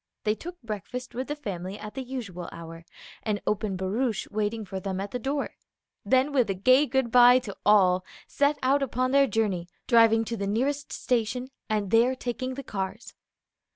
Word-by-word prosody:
They 215 - +2
took 350 +10 -9
breakfast 230 +4 -6
with 255 +2 -4
the 295 - -3
family 195 -8 -5
at 210 0 -8
the 265 - -4
usual 230 -10 -6
hour, 165 0 -10 0.4
an 210 -2 -1
open 205 -2 -1
barouche 210 +5 -1
waiting 215 +1 -2
for 190 0 -5
them 190 0 -3
at 195 +1 -4
the 250 - -3
door; 275 +3 -2 0.5
then 260 +2 +3
with 250 -6 +3
a 195 - 0
gay 255 +9 +4
good 265 -4 0
by 245 +1 +8
to 215 -6 -5
all 185 -3 +5 0.2
set 285 +1 +1
out 275 +2 +3
upon 255 -1 0
their 275 0 +5
journey, 200 -8 0 0.2
driving 225 -2 +5
to 230 - -3
the 200 -1 -2
nearest 275 +7 -1
station, 245 +1 -1 0.2
and 210 -3 -1
there 240 +3 +4
taking 255 +1 -4
the 275 - -6
cars. 200 +1 -5
230 Hz, 185 wpm, -27 LUFS, 200-255 Hz, 0.5 s, by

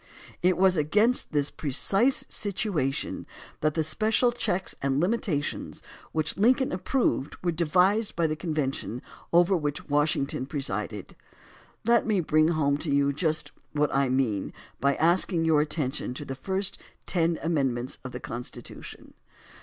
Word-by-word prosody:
It 180 -1 +3
was 190 0 +4
against 210 +11 +2
this 145 -2 0
precise 195 - +2
situation 185 - -1 0.3
that 155 -1 0
the 160 - +1
special 215 +9 +2
checks 190 -6 -1
and 135 0 +1
limitations 175 -5 -1 0.3
which 155 -1 -1
Lincoln 255 +6 +3
approved 185 - 0
were 175 - +2
devised 180 +7 +2
by 170 - +1
the 155 -1 0
convention 150 -7 -3 0.3
over 175 +3 +5
which 150 -3 -3
Washington 145 -2 0
presided. 105 -8 -4 0.7
Let 235 0 +3
me 210 -3 +2
bring 155 -2 +3
home 145 -4 +1
to 155 0 -3
you 140 0 +2
just 155 +1 -1 0.2
what 150 0 +1
I 135 -1 +2
mean 125 -7 0 0.3
by 140 0 +2
asking 170 0 +2
your 155 -2 +4
attention 150 -4 -2
to 145 - -6
the 135 - -4
first 190 +8 -3 0.3
ten 170 -2 +1
amendments 135 -7 0
to 130 - -8
the 125 - -7
Constitution. 120 0 -8
155 Hz, 140 wpm, -27 LUFS, 140-185 Hz, 0.7 s, over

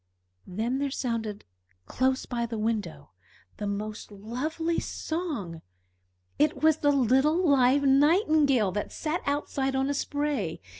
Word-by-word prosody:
Then 225 +8 -2
there 280 0 -1
sounded 230 -6 -3 0.4
close 260 - 0
by 235 -2 -2
the 230 -1 -5
window 215 -1 -3 0.5
the 205 - -4
most 210 +2 -5
lovely 280 +11 -3
song. 285 - -4 0.8
It 300 +1 +1
was 315 -1 +5
the 290 -2 +2
little 280 +7 +3
live 275 0 +4
Nightingale, 285 - +4
that 205 +2 -4
sat 315 +2 -3
outside 280 -2 -1
on 270 +1 +1
a - - 0
spray. 285 - -2
265 Hz, 130 wpm, -27 LUFS, 220-295 Hz, 0.8 s, was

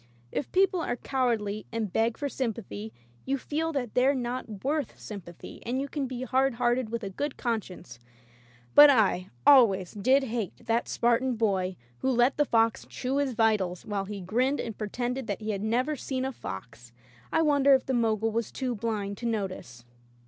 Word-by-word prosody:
If 285 - -3
people 380 -1 +3
are 245 - -1
cowardly 230 -6 -1
and 220 -5 -3
beg 225 +1 +1
for 290 - -2
sympathy, 210 - -4 0.3
you 275 +1 -1
feel 315 +4 -2
that 250 -6 -3
they're 265 +3 +3
not 240 -5 -4
worth 290 -1 -2
sympathy, 185 -5 -9
and 250 +3 -2
you 275 - -2
can 280 -1 -3
be 255 0 -5
hard 265 0 +1
hearted 240 -1 +1
with 230 0 -4
a 195 - -4
good 285 +8 -3
conscience, 195 - -4 0.7
but 290 0 +10
I 205 -8 +3 0.2
always 200 -10 +6
did 260 +7 +3
hate 235 -2 -4
that 230 +1 0
Spartan 240 +2 +1
boy 190 -4 0 0.2
who 265 - 0
let 245 +1 +3
the 295 - +3
fox 225 -3 +2
chew 265 +2 -2
his 280 -3 0
vitals 215 -6 +1
while 200 -2 -2
he 200 0 -6
grinned 250 +10 0
and 225 -3 -4
pre 210 -1 -4
tended 250 +2 -3
that 200 - -2
he 215 0 -2
had 200 -2 -3
never 250 +8 0
seen 260 -2 -3
a 265 - -2
fox. 115 - -9 0.4
I 320 - +3
won 290 -3 +3
dered 275 0 +7
if 260 - -1
the 265 - -1
Mogul 225 -2 +1
was 230 0 -2
too 255 -2 -2
blind 210 -3 -3
to 235 - -3
notice. 185 - -4
235 Hz, 190 wpm, -28 LUFS, 210-265 Hz, 0.7 s, but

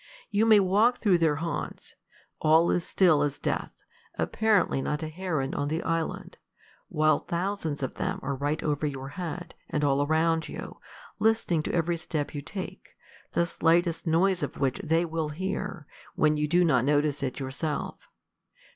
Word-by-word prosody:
You 215 +2 +3
may 215 -2 +7
walk 210 +6 +3
through 190 -6 +3
their 160 -3 +3
haunts: 165 +3 -5 0.5
all 160 +2 +4
is 175 - +1
still 175 -7 +3
as 145 -1 0
death, - - -3 0.3
apparently 215 -10 +2
not 150 +3 -2
a 155 - -3
heron 155 -5 -2
on 145 - -1
the 160 +3 -2
island, 165 -1 -3 0.5
while 155 0 +2
thousands 170 -5 -3
of 130 - -2
them 190 +1 -3
are 140 - -1
right 145 +3 -2
over 150 0 0
your 135 -1 -5
head, 175 +2 -6 0.2
and 150 - -1
all 140 -1 +3
around 160 +2 +1
you, - - -8 0.4
listening 220 -7 +2
to - - -4
every 170 0 +1
step 155 -3 -3
you 145 - -4
take, 185 +6 -8 0.4
the 170 - +2
slightest 170 0 +1
noise 180 +3 +3
of - - -4
which 135 -2 0
they 165 +2 +1
will 160 -2 -2
hear, 185 0 -4 0.3
when 155 0 +3
you 150 0 0
do 175 +3 +3
not 130 -7 +3
notice 145 +1 +1
it 135 -1 -3
yourself. 140 +3 -4
160 Hz, 165 wpm, -27 LUFS, 150-180 Hz, 0.5 s, may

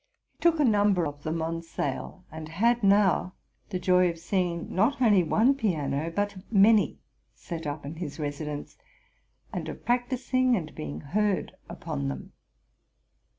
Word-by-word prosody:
He - - -44
took 335 -2 +3
a 295 - +4
num 205 -3 +4
ber 175 -2 +1
of 145 -1 -6
them 160 +2 -2
on 165 +1 -2
sale, 165 +3 -5
and 155 0 -7
had 230 +8 +2
now 195 -3 +3 0.3
the 185 - -2
joy 180 0 +3
of 165 - -5
seeing, 175 -1 -2
not 225 +10 +2
only 210 -7 +5
one 220 - +3
piano, 160 - -1
but 205 +3 -2
many, 210 +1 +5 0.4
set 165 -3 -6
up 145 0 -5
in 150 +3 -7
his 165 -2 -6
residence, 145 0 -5 0.7
and - - -4
of - - -9
practising 255 +1 +1
and 160 -7 -4
being 75 0 -6
heard 205 +5 0 0.2
upon 70 0 -4
them. 65 -1 -6
180 Hz, 155 wpm, -27 LUFS, 155-210 Hz, 0.7 s, only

